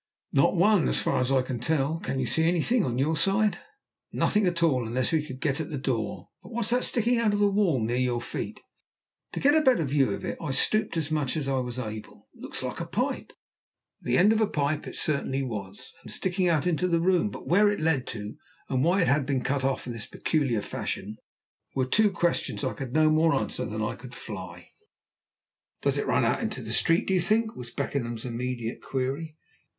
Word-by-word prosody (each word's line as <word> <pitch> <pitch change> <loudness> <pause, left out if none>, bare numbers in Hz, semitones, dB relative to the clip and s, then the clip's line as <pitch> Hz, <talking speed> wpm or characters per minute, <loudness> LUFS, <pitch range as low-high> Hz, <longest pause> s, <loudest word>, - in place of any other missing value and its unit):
"Not 140 +6 +4
one, 195 0 +4
as - - +2
far - - +1
as 125 +1 0
I 130 -1 +3
can 125 -2 -4
tell. 155 +4 0
Can 135 - -3
you 130 - 0
see 160 +5 +2
anything 180 +7 +2
on 125 -6 -1
your 150 +5 +1
side?" 195 +2 +1 0.5
"Nothing 210 -2 +2
at 170 -1 0
all, 130 -8 +2
unless 125 +2 -1
we 160 -2 +2
could 130 -3 -8
get 145 0 0
at 155 - -5
the 150 - -3
door. 115 -6 -3
But - - -13
what's 235 -1 -2
that 250 +1 +2
sticking 235 0 +1
out 220 -3 +2
of 205 - 0
the 205 - +5
wall 195 -9 +2
near 115 +2 -1
your 125 -1 +1
feet?" 120 - -5 0.7
To - - -3
get 285 +2 +4
a 315 - +5
better 255 - +4
view 135 -1 +2
of - - -4
it - - -4
I 150 -5 -2
stooped 215 +2 +1
as 155 -2 -1
much 150 -1 0
as 145 -3 -2
I 135 -1 +1
was 125 -1 -4
able. 110 -3 -7
"It - - -19
looks - - -4
like - - -4
a - - -4
pipe." - - -2 0.7
The 125 +1 +1
end 210 +4 +6
of 220 - +1
a 215 - +3
pipe 145 -2 -1
it - - -7
certainly 140 -3 0
was, 105 -5 -6
and - - -10
sticking 185 -1 0
out 155 -4 +2
into 180 +1 +1
the 170 -2 +2
room, 185 +3 +2
but - - -9
where 205 +4 +4
it 205 - -1
led 155 -5 +1
to, 105 -2 -6 0.3
and 130 -1 +1
why 180 +3 +3
it - - 0
had 140 -1 +2
been 135 -3 0
cut 135 0 0
off 135 0 0
in 120 - -5
this 115 -3 -4
peculiar 135 -10 0
fashion, 105 +1 -4 0.6
were 130 -1 +1
two 210 +11 +3
questions 175 -2 -1
I - - -1
could 135 -3 -6
no 155 0 +5
more 160 +1 +4
answer - - -2
than - - -3
I - - -1
could - - -11
fly. - - -8 1.1
"Does - - +2
it - - -2
run - - +2
out - - +1
into - - -3
the - - -4
street, 165 +1 +3
do 190 - +1
you 185 - +3
think?" 220 +5 +1
was 120 -1 -8
Beckenham's 120 -3 -3
immediate 120 -1 -4
query. 140 +4 -3
150 Hz, 225 wpm, -27 LUFS, 130-180 Hz, 1.1 s, end